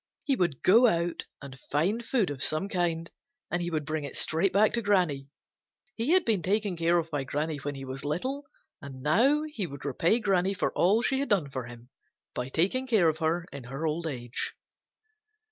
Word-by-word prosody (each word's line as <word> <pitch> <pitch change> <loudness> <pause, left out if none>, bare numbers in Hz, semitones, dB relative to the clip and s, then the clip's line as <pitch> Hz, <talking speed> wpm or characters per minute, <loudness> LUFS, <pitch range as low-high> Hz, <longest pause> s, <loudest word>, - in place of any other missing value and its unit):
He 280 -4 +1
would 170 - -1
go 230 +6 +7
out 170 -3 0 0.2
and 135 -1 -10
find 190 +11 +1
food 225 - +1
of 135 -2 -6
some 155 +6 0
kind, 170 -4 -1 0.4
and 175 - 0
he 175 - -2
would 155 -3 -2
bring 155 0 -2
it 140 - -6
straight 170 +4 +1
back 210 +2 +4
to 235 - +1
Granny. 180 -10 +1 0.7
He 230 +5 -2
had 370 -1 +4
been 215 -5 +2
taken 200 +1 0
care 170 +1 +2
of 165 -1 -2
by 145 -3 -1
Granny 150 +3 -2
when 145 0 -5
he 135 0 -7
was 135 +1 -6
little, 260 - -3 0.3
and 135 -3 -9
now 255 - +3
he 295 - -4
would 140 -1 -9
repay 165 - +2
Granny 195 -3 +1
for 200 - 0
all 210 +6 +3
she 265 +1 +2
had 280 - -2
done 170 -9 +1
for 130 -2 -4
him 120 +1 -12 0.4
by 125 +1 -4
taking 200 - +1
care 210 -9 +4
of 155 0 -3
her 165 +1 0
in 140 -3 -8
her 135 +6 -5
old 160 +2 -1
age. 120 -4 -4
170 Hz, 205 wpm, -28 LUFS, 145-205 Hz, 0.7 s, go